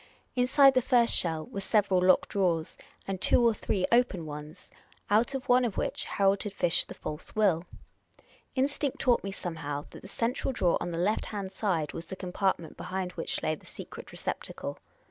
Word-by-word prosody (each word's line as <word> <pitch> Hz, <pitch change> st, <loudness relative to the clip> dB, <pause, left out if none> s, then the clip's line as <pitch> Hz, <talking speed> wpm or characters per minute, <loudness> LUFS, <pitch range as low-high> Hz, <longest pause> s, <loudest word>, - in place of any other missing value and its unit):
Inside 265 Hz, +2 st, +6 dB
the 255 Hz, -, +3 dB
first 240 Hz, -1 st, +4 dB
shell 160 Hz, -2 st, +1 dB
were 200 Hz, -, -6 dB
several 195 Hz, -2 st, +2 dB
locked 185 Hz, 0 st, +4 dB
drawers, 175 Hz, -5 st, 0 dB, 0.3 s
and 195 Hz, -1 st, -3 dB
two 240 Hz, -, +4 dB
or 230 Hz, -, +4 dB
three 195 Hz, -2 st, -1 dB
open 235 Hz, -8 st, +3 dB
ones, 150 Hz, 0 st, -9 dB, 0.4 s
out 235 Hz, +6 st, +3 dB
of 270 Hz, +1 st, -4 dB
one 250 Hz, 0 st, +5 dB
of 230 Hz, -5 st, -2 dB
which -, -, -1 dB
Harold 195 Hz, 0 st, +2 dB
had 205 Hz, -2 st, -4 dB
fished 170 Hz, -3 st, +1 dB
the -, -, -9 dB
false 150 Hz, 0 st, -7 dB
will. 190 Hz, -6 st, +3 dB, 0.9 s
Instinct 280 Hz, +1 st, 0 dB
taught 245 Hz, -2 st, +2 dB
me 195 Hz, -, -3 dB
somehow 150 Hz, -6 st, -4 dB
that -, -, -11 dB
the -, -, -10 dB
central 235 Hz, +6 st, -1 dB
drawer 180 Hz, -8 st, +2 dB
on 175 Hz, -, -2 dB
the 170 Hz, -, -4 dB
left 195 Hz, +6 st, 0 dB
hand 200 Hz, -3 st, -5 dB
side 175 Hz, -8 st, -1 dB
was 165 Hz, 0 st, -7 dB
the 190 Hz, -, -6 dB
compartment 185 Hz, -2 st, -2 dB
behind 185 Hz, -1 st, -3 dB
which -, -, -3 dB
lay 155 Hz, -, +1 dB
the 155 Hz, -, -10 dB
secret -, -, -10 dB
receptacle. -, -, -5 dB
195 Hz, 185 wpm, -29 LUFS, 170-235 Hz, 0.9 s, Inside